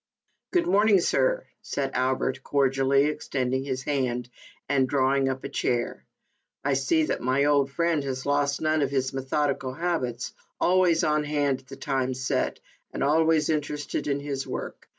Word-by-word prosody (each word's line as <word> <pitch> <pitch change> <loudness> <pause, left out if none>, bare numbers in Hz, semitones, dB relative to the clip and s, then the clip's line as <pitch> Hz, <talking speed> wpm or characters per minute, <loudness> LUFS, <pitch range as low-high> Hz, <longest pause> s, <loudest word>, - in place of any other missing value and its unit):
" - - -50
Good 355 -2 +3
morning, 205 +1 +4
sir," - - +1 0.2
said 135 -1 -3
Albert, 130 +1 0
cordially 135 0 +2
extending 130 -3 -1
his 130 -1 -3
hand, 125 -4 -1 0.4
and 135 -2 +2
drawing 135 -1 +2
up 130 0 -4
a - - -3
chair. 120 -1 -2 0.3
" - - -53
I 140 - +2
see 135 +4 +2
that - - -1
my 130 +3 +2
old 140 -2 +3
friend 165 0 0
has 130 -2 -4
lost 145 0 +1
none 155 0 +2
of 140 - +1
his 135 -1 -1
methodical 135 0 -1
habits. 130 -8 -2 0.3
Always 180 -2 +3
on 150 0 +2
hand 145 -3 0
at 130 - -23
the 135 - -9
time 130 -2 -1
set, 130 0 -1 0.3
and - - -3
always 160 +1 +3
interested 150 -1 -2
in 140 -1 0
his 140 -1 -4
work. - - -6
140 Hz, 170 wpm, -26 LUFS, 130-150 Hz, 0.4 s, morning